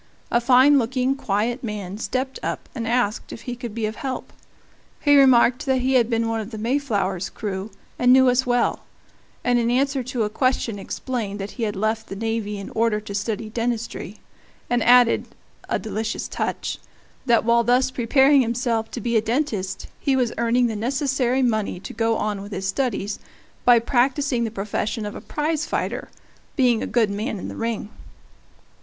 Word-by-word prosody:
A 235 - +3
fine 260 +4 +6
looking, 255 +2 0
quiet 230 +2 -1
man 205 -3 -5
stepped 260 +3 -2
up - - -4
and 230 -3 -4
asked 230 -3 0
if 225 - -8
he 245 +1 -5
could 240 -3 -7
be 225 -2 -1
of 215 0 -4
help; 265 -2 -5 0.7
he 290 -1 +4
remarked 255 -2 +5
that 260 -1 +2
he 260 +1 +1
had 240 -3 +4
been 230 -1 +1
one 225 0 -1
of 215 -1 -5
the 220 - -7
Mayflower's 215 -6 -1
crew, 200 -1 -5 0.3
and 250 0 +5
knew 260 0 +7
us 250 +1 +3
well; 245 -1 +1 0.6
and 245 -1 +3
in 235 0 +1
answer 270 +2 +1
to 250 -2 -2
a - - +1
question 245 -3 0
explained 210 -1 -4
that 195 +1 -5
he 240 - -5
had 205 - -6
left 220 +2 -1
the 195 - -6
navy 220 -1 -2
in 200 - -7
order 225 -1 +1
to 210 -1 -8
study 215 +2 -3
dentistry, 230 -3 -3 0.5
and 245 -1 +2
added 245 0 +5 0.4
a - - +1
delicious 215 0 -3
touch - - -3 0.5
that 235 -2 +4
while 235 0 +4
thus 250 +2 +3
preparing 265 +3 +4
himself 230 -2 -1
to 240 - -6
be 235 +2 -1
a 220 - +5
dentist 225 -5 -2
he 275 - +1
was 250 -3 +1
earning 235 +1 +3
the 225 -2 -1
necessary 260 +2 0
money 220 -6 0
to - - -8
go 225 -1 +1
on 210 -2 -2
with 200 +1 -9
his 195 -1 -3
studies 205 -2 -1 0.5
by 245 -1 +7
practicing 250 +1 +1
the - - -2
profession 210 +1 -3
of 205 - -5
a - - -8
prize 305 0 -2
fighter, - - -3 0.5
being 245 -5 +3
a - - -2
good 225 -4 +2
man 215 +2 -3
in - - -6
the - - -7
ring. 225 -2 -3
235 Hz, 185 wpm, -23 LUFS, 215-255 Hz, 0.7 s, knew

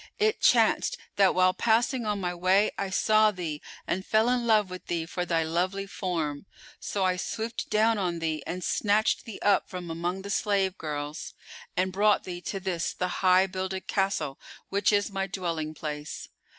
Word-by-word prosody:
It 435 0 +1
chanced - - +4 0.2
that 195 -1 +4
while 185 0 +4
passing 235 +2 +1
on 210 -1 0
my 180 -2 -2
way 185 +4 +3
I 195 - -3
saw 215 +2 +4
thee 170 -7 -4 0.2
and 185 +2 -2
fell 220 +3 +2
in 245 -1 +1
love 210 -4 +3
with 185 - -8
thee 170 -2 -1
for 180 +1 -3
thy 165 -1 +2
lovely 180 +5 -1
form: 170 -5 -3 0.3
so 200 - -2
I 185 0 +1
swooped 225 +5 -4
down 220 0 +3
on 175 -3 -1
thee 160 -2 -2
and 180 0 -4
snatched 210 +5 +1
thee 225 - -7
up 205 -2 +3
from 180 -2 -6
among 175 +3 -3
the 200 - -5
slave 195 -3 +1
girls 150 0 -5 0.4
and 185 0 +1
brought 210 +2 +3
thee 175 -1 -6
to 195 - -4
this 180 -3 -2
the 180 0 -3
High 185 0 +5
builded 190 0 -4
Castle, 190 -8 -1 0.3
which 200 +2 +2
is 205 0 +1
my 195 0 -2
dwelling 165 -5 -3
place. 150 -1 -6
185 Hz, 180 wpm, -28 LUFS, 175-205 Hz, 0.4 s, High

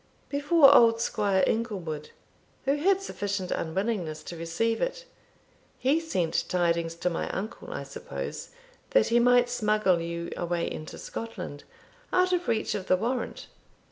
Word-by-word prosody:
"Before 285 0 +6
old 230 -4 +6
Squire 200 -4 +1
Inglewood, 180 -10 -2 0.6
who 275 +1 +3
had 385 +5 +2
sufficient 200 - -3
unwillingness 170 -3 -2
to 170 - -7
receive 170 +8 -1
it. - - -2 0.7
He 280 +5 +2
sent 185 - -1
tidings 170 -2 +1
to 170 +1 -1
my 165 - -2
uncle, 210 +4 -5
I - - -4
suppose, - - -6 0.5
that - - +4
he 235 +1 +4
might 245 0 +5
smuggle 215 -7 +2
you 170 0 -4
away 175 -1 -1
into 155 - -7
Scotland, 185 -10 -7 0.5
out 365 0 +3
of 355 0 0
reach 220 -1 0
of 195 -3 -4
the 185 - +4
warrant. 240 +6 -3
210 Hz, 140 wpm, -28 LUFS, 170-245 Hz, 0.7 s, Before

